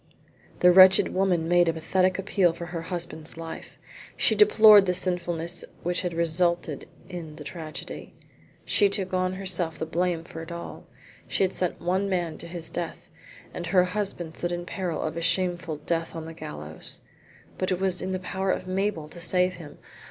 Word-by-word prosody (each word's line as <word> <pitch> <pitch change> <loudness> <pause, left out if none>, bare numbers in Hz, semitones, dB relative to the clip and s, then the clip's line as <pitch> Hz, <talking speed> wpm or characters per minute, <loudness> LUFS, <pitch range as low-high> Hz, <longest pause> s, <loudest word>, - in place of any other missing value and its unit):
The 180 - +7
wretched 185 +1 +7
woman 180 -4 +1
made 175 0 +4
a - - +1
pathetic 185 +3 +1
appeal 195 -3 +2
for 170 - -7
her 170 -1 -5
husband's 165 -2 -5
life. 165 0 -8 0.4
She - - +4
deplored 210 -1 +7
the 180 - +1
sinfulness 175 -1 -1 0.2
which 175 +1 0
had 175 -3 -3
resulted 170 -2 0 0.2
in 170 -4 -7
the 150 - -9
tragedy. 155 0 -7 0.5
She 205 -2 +3
took 190 -1 -3
on 185 0 +1
herself 185 -3 0
the - - -3
blame 170 0 -1
for 165 -1 -9
it 165 +1 -9
all. 170 0 -8 0.4
She - - 0
had 190 - +1
sent 180 -2 -1
one 185 +3 0
man 175 -4 -2
to - - -7
his 170 -1 -5
death, 175 -1 -5 0.4
and 175 - -5
her 180 +1 +4
husband 180 -4 -3
stood 175 - -2
in 175 0 -3
peril 180 -3 -3
of 155 +1 -3
a - - -2
shameful 175 -2 0
death 165 +2 -2
on 160 -1 -5
the 165 - -8
gallows. 75 - -9 0.6
But 185 - 0
it 180 - 0
was 190 -2 0
in 185 - -3
the 185 - -1
power 190 +1 -3
of - - 0
Mabel 185 -4 -1
to 175 - -12
save 180 +1 +2
him. 160 -5 -11
175 Hz, 185 wpm, -26 LUFS, 165-185 Hz, 0.6 s, The